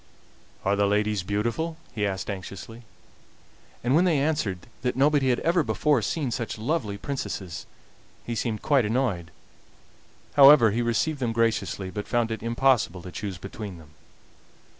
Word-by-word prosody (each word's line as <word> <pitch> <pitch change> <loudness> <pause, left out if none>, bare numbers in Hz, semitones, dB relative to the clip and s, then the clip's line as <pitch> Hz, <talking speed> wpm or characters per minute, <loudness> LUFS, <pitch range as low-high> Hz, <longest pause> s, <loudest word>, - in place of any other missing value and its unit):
"Are 100 +1 +3
the 100 0 +2
ladies 105 0 +1
beautiful?" 115 - -2 0.2
he 105 -3 0
asked 95 -1 -3
anxiously. 100 +3 -7 1.0
And 125 +2 +2
when 165 +5 +5
they 175 -5 +3
answered 135 - -1 0.2
that 125 -1 -1
nobody 140 0 +3
had 125 - +2
ever 170 +1 +3
before 150 -4 +1
seen 135 +4 -2
such 115 -2 -3
lovely 110 -3 -2
princesses 100 - -5 0.6
he 120 - -3
seemed 115 -1 -2
quite 140 -4 +3
annoyed. 105 -7 -1 1.0
However, 140 -5 +8
he 115 +4 0
received 120 +6 0
them 120 -3 -1
graciously, 110 -4 0
but 105 +3 -5
found 120 -2 0
it 110 - -4
impossible 115 -6 +1
to 90 - -8
choose 100 -1 -5
between 100 0 -7
them. 75 -2 -16
115 Hz, 150 wpm, -26 LUFS, 100-135 Hz, 1.0 s, However